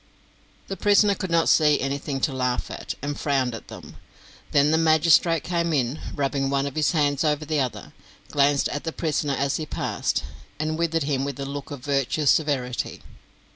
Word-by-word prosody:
The 195 - -4
prisoner 205 0 +4
could 190 -2 -5
not 165 -1 +2
see 150 -2 +4
anything 140 0 -3
to 135 - +1
laugh 125 -1 -1
at, - - -5
and 145 0 -3
frowned 135 -4 0
at 115 - -8
them. - - -11 0.5
Then 145 +1 +4
the 160 - +3
magistrate 165 0 +4
came 170 -1 -1
in, 130 +1 0 0.2
rubbing 135 -1 -1
one 140 0 0
of 140 - -4
his 155 +2 +1
hands 145 -3 +1
over 150 -1 0
the 155 0 0
other, 130 -3 -4 0.4
glanced 140 0 +3
at 145 - -4
the 160 - -4
prisoner 150 -3 -1
as 140 0 0
he 155 - -5
passed, - - -2 0.4
and 155 +1 -1
withered 165 -2 +1
him 140 -2 -1
with 140 -1 -4
a 140 - -3
look 140 0 -6
of 140 -4 -8
virtuous 140 +1 +2
severity. 130 -6 -1
145 Hz, 185 wpm, -24 LUFS, 135-160 Hz, 0.5 s, prisoner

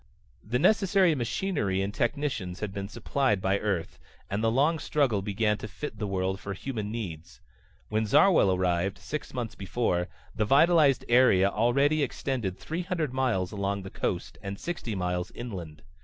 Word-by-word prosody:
The 120 +4 -1
necessary 195 0 +4
machinery 120 - -1
and 100 +1 -3
technicians 120 -9 -2
had 105 -3 -4
been 100 -1 -4
supplied 130 0 0
by 95 +1 +1
Earth, 95 -6 -2 0.3
and 100 +3 -1
the 115 - +4
long 145 +7 +2
struggle 135 -12 +1
began 105 +1 0
to - - -6
fit 110 +2 -7
the 105 - -2
world 95 0 -1
for 100 - -5
human 110 -2 -4
needs. 90 -7 -6 0.5
When 110 0 0
Zarwell 160 - +5
arrived, 90 +1 0
six 150 +10 -6
months 120 -3 -4
before, 95 -3 -1 0.3
the 110 - 0
vitalized 145 +2 +4
area 120 -6 +5
already 140 +8 +2
extended 125 -8 -2
three 165 +3 -4
hundred 170 -7 -2
miles 120 -9 0
along 100 -1 -2
the 95 - -8
coast, - - -3
and 100 0 -6
sixty 140 -11 -4
miles 90 -1 -2
inland. 90 -10 -7
110 Hz, 160 wpm, -28 LUFS, 95-135 Hz, 0.5 s, Zarwell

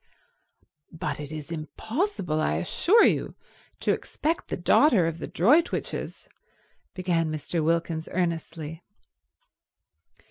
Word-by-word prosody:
"But 155 -3 -4
it 145 0 -7
is 155 0 -7
impossible, 180 - -2
I 75 - +1
assure 345 - +4
you, - - +1 0.5
to - - +2
expect 320 +3 -2
the - - -3
daughter 195 - +4
of 165 0 -2
the - - -5
Droitwiches—" 290 - +1 0.7
began 170 -3 0
Mr. 155 +2 -2
Wilkins 165 0 0
earnestly. 165 -2 -3
165 Hz, 105 wpm, -26 LUFS, 155-190 Hz, 0.7 s, assure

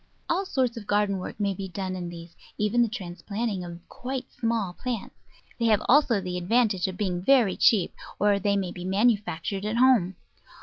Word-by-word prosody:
All 375 +3 0
sorts 255 -6 0
of 210 -3 -8
garden 205 -2 +1
work 185 - -7
may 200 -1 +1
be 190 +1 -5
done 185 0 -4
in 175 -1 -5
these, 170 0 -10 0.2
even 210 +3 +2
the 235 - +4
transplanting 200 0 -4
of 170 0 -10
quite 260 0 -6
small 225 -6 -1
plants. 240 +1 -4 0.5
They 230 - +1
have 215 -2 +3
also 255 -5 +5
the 180 -1 -3
advantage 205 0 +2
of 185 -1 -6
being 185 -4 -1
very 235 -5 +4
cheap, 200 -6 +3 0.2
or 205 0 +3
they 200 +1 +1
may 185 -3 -2
be 180 - -8
manufactured 195 -2 0
at 215 +2 -1
home. 240 -8 +4
205 Hz, 185 wpm, -26 LUFS, 185-230 Hz, 0.5 s, also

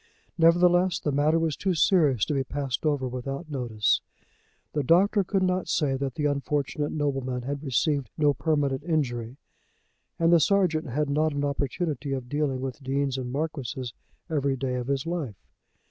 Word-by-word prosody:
Nevertheless 175 +2 +4
the 150 - -1
matter 150 +3 +3
was 165 -3 0
too 190 -2 -1
serious 155 - +3
to - - -2
be 135 -1 +1
passed 140 +1 -3
over 145 -3 0
without 135 +5 -5
notice. 120 -6 +1 0.7
The 150 - +1
doctor 195 - +4
could 190 +1 0
not 185 0 0
say 140 -4 +1
that 135 -1 -3
the 150 - -1
unfortunate 145 +1 -1
nobleman 135 -4 -2
had 140 +2 -4
received 140 0 0
no 145 -2 +4
permanent 145 -3 0
injury; 130 -7 -1 0.8
and 165 +1 +3
the 170 - +7
sergeant 165 -2 +2
had 145 +4 -1
not 155 +2 +1
an 145 0 -1
opportunity 140 0 -2
of 130 -2 -4
dealing 145 -3 -1
with 135 +2 -5
deans 135 0 0
and 125 -2 -4
marquises 135 -5 -3 0.3
every 140 -4 0
day 130 0 -2
of 125 -1 -3
his 140 0 -1
life. 165 - -3
145 Hz, 165 wpm, -26 LUFS, 135-160 Hz, 0.8 s, the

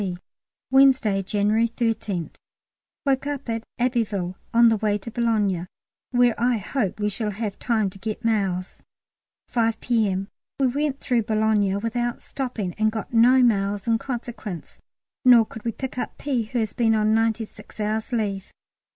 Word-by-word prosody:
T. 185 -3 -3 0.5
Wednesday, 265 -7 +5
January 210 +4 +1
13th. 220 -7 -2 0.7
Woke 275 0 +1
at 250 -6 -3
Abbeville; 225 -7 0
now 185 - -10 0.2
on 235 -1 +8
the 225 - +2
way 210 0 +1
to 220 +3 -9
Boulogne, 210 -7 0 0.4
where 245 -1 +4
I 245 -1 +3
hope 210 -1 -2
we 210 - +1
shall 210 +1 -2
have 205 0 -4
time 220 -5 +1
to 195 - -14
get 220 +3 -5
mails. 195 -5 -1 0.7
5 225 -2 +1
P.M. 200 -5 0 0.3
We 270 - +3
went 280 +2 -1
through 245 -3 +1
Boulogne 215 -2 +1
without 240 +2 -2
stopping, 235 -9 -4
and 215 0 +3
got 220 +1 -6
no 250 +3 +6
mails 200 -3 +1
in 230 -1 +2
consequence; 230 - -6 0.4
nor 245 -3 +7
could 220 0 -10
we 230 - -1
pick 260 +2 -5
up - - -4
P., 255 -6 -1
who 230 +3 -4
has 220 -4 -1
been 225 -2 +2
on 215 0 +2
ninety 225 0 +1
six 215 - -16
hours' 215 +3 -2
leave. 205 -5 -2
225 Hz, 160 wpm, -24 LUFS, 205-240 Hz, 0.7 s, on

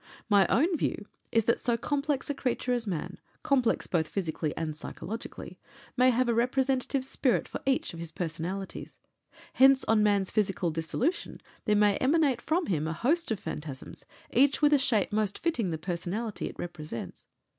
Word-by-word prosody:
My 200 -3 +5
own 335 +8 +3
view 275 - -2 0.3
is 225 -2 +2
that 235 - +2
so 235 -1 0
complex 285 +2 -1
a 290 - -1
creature 250 -2 -1
as 240 -3 -2
man 175 -6 -4 0.2
complex 265 -6 +2
both 160 -3 0
physically 160 -4 -2
and 155 -2 -3
psychologically 195 +7 -7 0.4
may 255 0 +5
have 250 0 +2
a 235 - +2
representative 260 +2 +1
spirit 260 -2 +1
for - - -6
each 265 -8 +1
of 165 - -8
his 165 -1 -5
personalities. 175 +4 -5 0.5
Hence 270 0 +6
on 220 -1 +3
man's 200 -2 +2
physical 195 -5 0
dissolution 165 - -2 0.3
there 210 - +3
may 205 -1 +4
emanate 275 -3 +2
from 335 +2 0
him 160 - -1
a 160 - -2
host 310 - +1
of 220 -4 -1
phantasms, 150 -5 -7 0.3
each 275 +3 +4
with 295 -1 +4
a 290 - +5
shape 220 -6 +1
most 210 -2 0
fitting 280 - 0
the 160 - -2
personality 180 +6 -3
it - - -12
represents. 155 -8 -7
225 Hz, 170 wpm, -29 LUFS, 175-265 Hz, 0.5 s, Hence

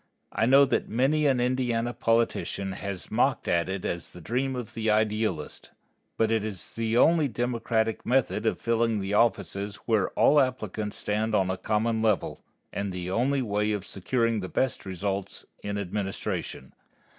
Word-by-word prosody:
I 110 - +1
know 135 +2 +7
that - - -1
many 140 +6 +2
an 130 -3 +2
Indiana 120 -1 0
politician 115 -4 0
has 95 -1 -6
mocked - - +1
at 85 +1 +1
it 95 -1 -3
as 85 0 -3
the - - -10
dream 130 +9 -1
of 120 -2 -6
the 110 -1 -1
idealist, 105 -6 0 0.5
but 110 0 +2
it 110 -2 +1
is 105 -4 -5
the 115 0 0
only 160 +2 +5
democratic 115 -2 -1
method 120 -3 +1
of - - 0
filling 115 -1 +1
the 95 +1 -3
offices 105 -2 +1
where 110 -4 +2
all 150 +1 +6
applicants 110 -6 -1
stand 110 +1 -1
upon 95 -2 +2
a - - -1
common 110 +2 0
level, 110 -4 0 0.3
and 100 -1 -2
the 90 0 -4
only 130 +6 +1
way 105 -1 0
of 100 -2 -3
securing 115 +4 0
the 95 -2 -5
best 130 -6 -1
results 95 +1 -3 0.2
in 100 0 -3
administration. 95 -8 -4
110 Hz, 165 wpm, -27 LUFS, 100-120 Hz, 0.5 s, know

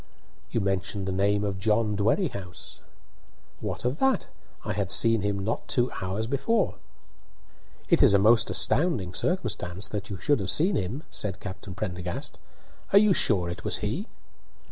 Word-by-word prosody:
"You 115 - -1
mentioned 95 0 -2
the - - -1
name 100 +2 +1
of 100 -2 -2
John 105 +1 +1
Dwerrihouse." 100 - -2 0.8
"What - - -5
of 125 +5 -1
that? 265 0 +2 0.4
I - - -2
had 100 -1 -2
seen 115 +1 +4
him 100 0 -1
not 105 +4 -3
two 125 -1 0
hours 95 +4 -2
before." 140 - 0 1.1
"It - - +3
is 100 - +6
a - - +7
most 110 +4 +4
astounding 110 - +1
circumstance 105 - -1
that 105 -1 -5
you 100 - -5
should 145 +7 +1
have 95 -2 -3
seen 175 - +3
him," 115 - -3
said 95 -3 -4
Captain 95 -1 -8
Prendergast. 90 -4 -5 0.5
"Are 200 - +6
you 205 -1 +6
sure 95 - +2
it 85 - -6
was - - -1
he?" - - -3
105 Hz, 160 wpm, -27 LUFS, 95-120 Hz, 1.1 s, a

